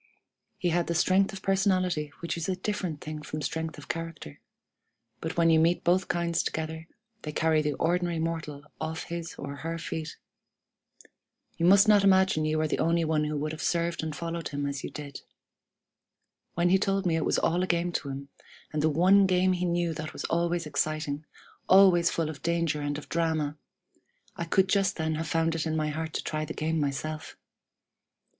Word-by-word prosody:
He 175 Hz, -, 0 dB
had 170 Hz, 0 st, +1 dB
the 170 Hz, -, -1 dB
strength 190 Hz, +4 st, +3 dB
of 195 Hz, -1 st, -9 dB
personality 185 Hz, -6 st, +1 dB
which 170 Hz, -, -2 dB
is 170 Hz, +1 st, -3 dB
a 185 Hz, -, +1 dB
different 185 Hz, -5 st, -3 dB
thing 155 Hz, 0 st, -6 dB
from 150 Hz, 0 st, -5 dB
strength 160 Hz, +2 st, -3 dB
of 145 Hz, -, -11 dB
character; 165 Hz, -, -6 dB, 0.8 s
but 160 Hz, +1 st, -5 dB
when 165 Hz, -1 st, +5 dB
you 160 Hz, -, +5 dB
meet 170 Hz, +2 st, +2 dB
both 180 Hz, +2 st, +2 dB
kinds 170 Hz, -1 st, 0 dB
together, 160 Hz, 0 st, -4 dB, 0.3 s
they 150 Hz, -, -5 dB
carry 160 Hz, 0 st, +2 dB
the 150 Hz, -1 st, -1 dB
ordinary 175 Hz, 0 st, 0 dB
mortal 160 Hz, -3 st, -3 dB, 0.2 s
off 160 Hz, 0 st, -3 dB
his 170 Hz, -1 st, -6 dB
or 140 Hz, 0 st, -6 dB
her 165 Hz, +2 st, -4 dB
feet. 160 Hz, -1 st, -5 dB, 1.4 s
You 170 Hz, -, +2 dB
must 200 Hz, +3 st, +7 dB
not 205 Hz, -2 st, +6 dB
imagine 190 Hz, -5 st, +4 dB
you 155 Hz, 0 st, +1 dB
are 155 Hz, -, +1 dB
the -, -, -2 dB
only 165 Hz, 0 st, +2 dB
one 155 Hz, -1 st, +1 dB
who 150 Hz, 0 st, -2 dB
would 155 Hz, +1 st, -2 dB
have 155 Hz, 0 st, -6 dB
served 170 Hz, 0 st, 0 dB
and 160 Hz, -2 st, -4 dB
followed 170 Hz, +1 st, -4 dB
him 145 Hz, 0 st, -3 dB
as 140 Hz, -1 st, -3 dB
you -, -, -4 dB
did. 145 Hz, -2 st, -8 dB, 1.3 s
When 175 Hz, +1 st, +2 dB
he 190 Hz, +1 st, +4 dB
told 195 Hz, -1 st, 0 dB
me 170 Hz, -2 st, +2 dB
it 160 Hz, -, 0 dB
was -, -, +1 dB
all 175 Hz, +2 st, +1 dB
a 185 Hz, -, 0 dB
game 175 Hz, 0 st, +1 dB
to 145 Hz, -, -3 dB
him, 140 Hz, +1 st, -6 dB, 0.4 s
and 150 Hz, -, 0 dB
the 155 Hz, -, +3 dB
one 190 Hz, +6 st, +5 dB
game 185 Hz, 0 st, +3 dB
he 180 Hz, 0 st, -1 dB
knew 170 Hz, -1 st, 0 dB
that 155 Hz, 0 st, -6 dB
was -, -, -6 dB
always 170 Hz, 0 st, 0 dB
exciting, 150 Hz, 0 st, -2 dB, 0.4 s
always 185 Hz, -3 st, +6 dB
full 165 Hz, -2 st, -1 dB
of 150 Hz, -, -11 dB
danger 170 Hz, -3 st, 0 dB
and 145 Hz, 0 st, -2 dB
of 150 Hz, -, -9 dB
drama, 160 Hz, -3 st, 0 dB, 0.8 s
I 170 Hz, -, -3 dB
could 190 Hz, +3 st, +3 dB
just 195 Hz, 0 st, +2 dB
then 160 Hz, -1 st, -1 dB
have 160 Hz, +1 st, -3 dB
found 165 Hz, +1 st, +1 dB
it 165 Hz, 0 st, -2 dB
in 160 Hz, -, -1 dB
my 155 Hz, -1 st, 0 dB
heart 160 Hz, +1 st, -4 dB
to -, -, -2 dB
try 155 Hz, -1 st, -2 dB
the 155 Hz, +1 st, -6 dB
game 160 Hz, +1 st, -1 dB
myself! 155 Hz, +2 st, -3 dB
165 Hz, 200 wpm, -28 LUFS, 155-175 Hz, 1.4 s, must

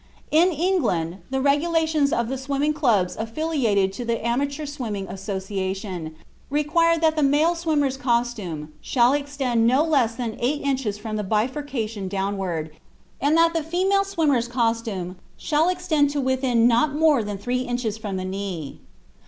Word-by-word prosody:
In 325 Hz, +4 st, +5 dB
England, 280 Hz, -, 0 dB
the 265 Hz, 0 st, -1 dB
regulations 310 Hz, +1 st, +2 dB
of 235 Hz, -1 st, 0 dB
the 265 Hz, -, -2 dB
Swimming 280 Hz, +3 st, 0 dB
Clubs 230 Hz, -, +1 dB
affiliated 225 Hz, -6 st, 0 dB
to 245 Hz, -, -5 dB
the 230 Hz, -1 st, -2 dB
Amateur 280 Hz, +5 st, -1 dB
Swimming 230 Hz, -9 st, -4 dB
Association, 190 Hz, -3 st, -4 dB, 0.3 s
require 320 Hz, +4 st, +2 dB
that 320 Hz, -1 st, +2 dB
the 310 Hz, -, +1 dB
male 295 Hz, +4 st, +3 dB
swimmer's 300 Hz, -6 st, 0 dB
costume 235 Hz, -, -2 dB
shall 245 Hz, 0 st, +3 dB
extend 275 Hz, -5 st, 0 dB
not 290 Hz, +7 st, +3 dB
less 240 Hz, -6 st, +2 dB
than 230 Hz, -2 st, -4 dB
eight 275 Hz, +5 st, 0 dB
inches 260 Hz, -7 st, -1 dB
from 215 Hz, 0 st, -5 dB
the 210 Hz, -, -2 dB
bifurcation 225 Hz, -1 st, -2 dB
downward, 190 Hz, -5 st, -2 dB, 0.5 s
and 290 Hz, +4 st, +3 dB
that 330 Hz, 0 st, +4 dB
the 330 Hz, -, 0 dB
female 375 Hz, +5 st, +1 dB
swimmer's 310 Hz, -11 st, +1 dB
costume 225 Hz, -7 st, -2 dB, 0.2 s
shall 315 Hz, +3 st, +1 dB
extend 350 Hz, -5 st, +1 dB
to 285 Hz, 0 st, -2 dB
within 260 Hz, -3 st, +2 dB
not 245 Hz, +5 st, +2 dB
more 305 Hz, -4 st, +4 dB
than 205 Hz, -1 st, -4 dB
three 245 Hz, +5 st, -2 dB
inches 245 Hz, -4 st, -3 dB
from 205 Hz, -4 st, -4 dB
the 185 Hz, -, -4 dB
knee. 185 Hz, -6 st, -5 dB
250 Hz, 150 wpm, -23 LUFS, 210-295 Hz, 0.5 s, In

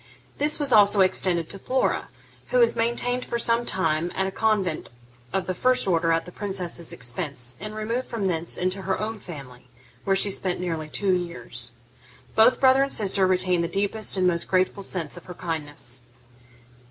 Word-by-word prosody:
This 295 Hz, +2 st, +3 dB
was 285 Hz, -4 st, +1 dB
also 205 Hz, -2 st, +6 dB
extended 180 Hz, -3 st, +2 dB
to 195 Hz, -, -3 dB
Flora, 260 Hz, +6 st, 0 dB, 0.4 s
who -, -, 0 dB
was 475 Hz, -1 st, +5 dB
maintained 245 Hz, +2 st, +1 dB
for 235 Hz, -, -3 dB
some 235 Hz, 0 st, +1 dB
time 170 Hz, -2 st, 0 dB
at 190 Hz, -, 0 dB
a 190 Hz, -, -2 dB
convent 195 Hz, -5 st, 0 dB, 0.4 s
of 195 Hz, -1 st, -1 dB
the 185 Hz, -, -2 dB
first 255 Hz, +7 st, +2 dB
order 165 Hz, -3 st, +2 dB
at 165 Hz, 0 st, +1 dB
the 180 Hz, -, -10 dB
princess's 180 Hz, -4 st, -3 dB
expense, 125 Hz, -1 st, -3 dB
and 215 Hz, +2 st, -7 dB
removed 230 Hz, +4 st, -2 dB
from 225 Hz, -5 st, -3 dB
thence 170 Hz, -2 st, 0 dB
into 185 Hz, +2 st, -1 dB
her 190 Hz, 0 st, -1 dB
own 215 Hz, +1 st, -3 dB
family, 130 Hz, -9 st, -10 dB, 0.4 s
where 195 Hz, -, +2 dB
she 200 Hz, +1 st, +3 dB
spent 185 Hz, -1 st, -1 dB
nearly 165 Hz, -3 st, -3 dB
two 195 Hz, +3 st, +1 dB
years. 120 Hz, -9 st, -3 dB, 0.6 s
Both 225 Hz, +3 st, +5 dB
brother 265 Hz, 0 st, +5 dB
and 275 Hz, 0 st, +1 dB
sister 195 Hz, -2 st, +2 dB
retained 185 Hz, -2 st, +2 dB
the -, -, 0 dB
deepest 200 Hz, +3 st, -1 dB
and 185 Hz, -, +2 dB
most 170 Hz, -1 st, +1 dB
grateful 185 Hz, +2 st, +1 dB
sense 180 Hz, -4 st, -4 dB
of 175 Hz, -, -11 dB
her 180 Hz, -, -9 dB
kindness. 145 Hz, -7 st, -5 dB
185 Hz, 180 wpm, -25 LUFS, 170-215 Hz, 0.6 s, also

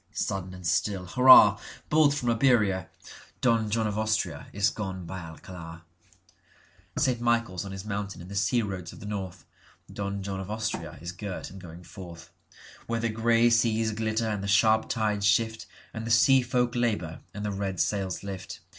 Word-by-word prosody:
Sudden 95 Hz, -1 st, -3 dB
and 90 Hz, -1 st, -11 dB
still—hurrah! 100 Hz, +5 st, +6 dB, 0.3 s
Bolt 150 Hz, -2 st, +5 dB
from 125 Hz, -5 st, 0 dB
Iberia! 110 Hz, -7 st, +2 dB, 0.5 s
Don 115 Hz, -3 st, +2 dB
John 110 Hz, +1 st, 0 dB
of 105 Hz, 0 st, -2 dB
AustriaIs 105 Hz, -2 st, -1 dB
gone 95 Hz, -4 st, -5 dB
by 95 Hz, +3 st, -6 dB
Alcalar.St. 85 Hz, +8 st, -7 dB
Michaels 115 Hz, -6 st, 0 dB
on 95 Hz, -, -7 dB
his 95 Hz, +1 st, -7 dB
Mountain 100 Hz, -1 st, -4 dB
in 85 Hz, -, -10 dB
the 100 Hz, -, -9 dB
sea 115 Hz, +4 st, +1 dB
roads 95 Hz, -4 st, -5 dB
of -, -, -12 dB
the -, -, -10 dB
north(Don 100 Hz, 0 st, -7 dB
John 95 Hz, 0 st, -4 dB
of 95 Hz, 0 st, -6 dB
Austria 110 Hz, +1 st, -4 dB
is 85 Hz, +1 st, -5 dB
girt 95 Hz, 0 st, -6 dB
and 95 Hz, 0 st, -11 dB
going 85 Hz, 0 st, -11 dB
forth.)Where 85 Hz, +6 st, -9 dB
the 115 Hz, 0 st, 0 dB
grey 115 Hz, +1 st, +3 dB
seas 115 Hz, -1 st, +2 dB
glitter 110 Hz, +1 st, -1 dB
and 105 Hz, -2 st, -2 dB
the -, -, -3 dB
sharp 110 Hz, +2 st, +3 dB
tides 105 Hz, -3 st, 0 dB
shiftAnd 110 Hz, +1 st, -2 dB
the -, -, -4 dB
sea 130 Hz, +4 st, +5 dB
folk 125 Hz, 0 st, 0 dB
labour 105 Hz, -10 st, -1 dB
and 105 Hz, 0 st, -4 dB
the 105 Hz, -, -1 dB
red 95 Hz, -2 st, -3 dB
sails 95 Hz, -4 st, -1 dB
lift. 95 Hz, -2 st, -7 dB
105 Hz, 160 wpm, -27 LUFS, 95-115 Hz, 0.5 s, still—hurrah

